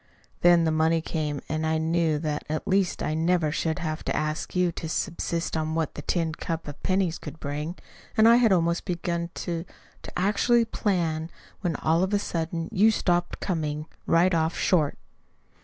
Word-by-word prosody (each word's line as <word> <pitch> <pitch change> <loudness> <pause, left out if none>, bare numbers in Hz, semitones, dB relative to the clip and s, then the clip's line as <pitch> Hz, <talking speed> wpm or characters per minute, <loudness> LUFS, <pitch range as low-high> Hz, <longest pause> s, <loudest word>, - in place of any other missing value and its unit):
Then 175 -1 +6
the 160 - +2
money 160 +1 +3
came 150 -3 -3
and 155 +1 -2
I 160 0 +1
knew 160 -1 +1
that 150 -1 -2
at 155 0 -3
least 195 -1 +1
I 155 - -1
never 165 -1 +2
should 160 0 -1
have 155 -3 -3
to - - -1
ask 155 +3 -2
you 180 -1 +3
to 160 -1 -6
subsist 170 0 -2
on 160 0 -1
what 160 -2 -1
the - - -6
tin 165 -3 0
cup 165 0 -4
of 145 - -8
pennies 185 -3 0
could 160 - -9
bring! 150 +4 -4 0.4
And 220 +1 +7
I 235 +1 +8
had 235 -3 +4
almost 170 -2 +2
begun 170 -2 -2
to 170 -2 -3 0.4
to - - -9
actually 210 +5 +3
plan, 170 -7 -1 0.3
when 175 -4 -1
all 160 +4 +2
of 190 +2 +1
a - - +4
sudden 165 -3 -3
you 215 +1 +5
stopped 175 -5 0
coming, 155 -4 -2 0.2
right 175 +2 +4
off 160 0 +1
short." 155 -6 +2
165 Hz, 185 wpm, -26 LUFS, 160-180 Hz, 0.4 s, I